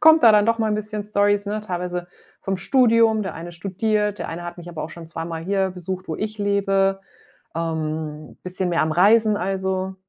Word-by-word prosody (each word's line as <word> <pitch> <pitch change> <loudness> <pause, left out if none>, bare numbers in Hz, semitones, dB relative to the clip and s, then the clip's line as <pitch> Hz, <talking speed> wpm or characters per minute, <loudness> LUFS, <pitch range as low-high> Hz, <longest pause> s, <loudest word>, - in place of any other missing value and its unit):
kommt 320 -1 +7
da 225 - +9
dann 210 0 +5
doch 230 0 +2
mal 220 -1 +1
'n - - +1
bisschen 215 -1 -4
Storys, 205 0 +2
ne? 210 +1 -2
Teilweise 180 -2 -4 0.3
vom 195 -1 -1
Studium. 230 0 +4
Der 190 - -4
eine 170 +1 -7
studiert, 205 +3 -1
der - - -4
eine 170 +1 -5
hat 175 0 -7
mich 175 0 -9
aber 165 -3 -5
auch 155 - -8
schon 170 -1 -10
zweimal 165 0 -5
hier 190 0 +1
besucht, 185 +1 -6
wo 160 - -2
ich 215 0 -4
lebe, 195 -1 +1 0.6
ähm, 155 -2 -3
bisschen 180 0 -2
mehr 170 - +2
am 155 - 0
Reisen 210 +5 +5
also. 190 0 -2
190 Hz, 200 wpm, -22 LUFS, 175-210 Hz, 0.6 s, da